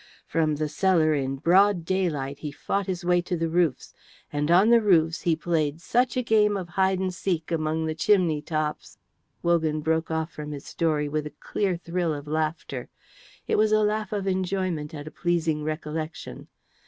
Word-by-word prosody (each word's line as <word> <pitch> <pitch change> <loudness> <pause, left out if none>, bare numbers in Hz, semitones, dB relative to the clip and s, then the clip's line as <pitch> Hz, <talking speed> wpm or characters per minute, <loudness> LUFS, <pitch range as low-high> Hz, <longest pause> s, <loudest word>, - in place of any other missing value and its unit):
From 155 -1 +1
the 155 +1 -1
cellar 155 0 +2
in 135 -2 -1
broad 180 +4 +3
daylight 150 -7 -1
he 150 - -5
fought 195 +6 -2
his 180 -1 -3
way 175 0 +3
to 175 0 -3
the 165 0 -1
roofs, 170 -6 0 0.4
and 145 +1 -1
on 190 +6 +5
the 235 -1 +6
roofs 165 -5 +3
he 170 -3 +2
played 155 -2 -1
such 245 +8 +1
a 250 - +1
game 210 -3 +3
of 180 -3 -6
hide 190 +1 +2
and 185 0 -2
seek 175 -3 -2
among 160 0 0
the 160 - -1
chimney 165 -3 +2
tops 155 -1 -3 0.2
" - - -46
Wogan 160 -3 +1
broke 160 +1 0
off 160 0 -2
from 150 0 -7
his 140 -1 -8
story 155 -3 0
with 150 +1 -2
a - - -13
clear 190 -4 -1
thrill 170 -2 -2
of 145 0 -7
laughter; 155 -4 -3 0.6
it - - +1
was 215 0 +3
a 215 0 +4
laugh 210 -1 -1
of 205 -2 -2
enjoyment 185 -5 -1
at 145 -1 -7
a 155 - -8
pleasing 165 -3 0
recollection. 155 +1 -5
165 Hz, 190 wpm, -26 LUFS, 155-185 Hz, 0.6 s, the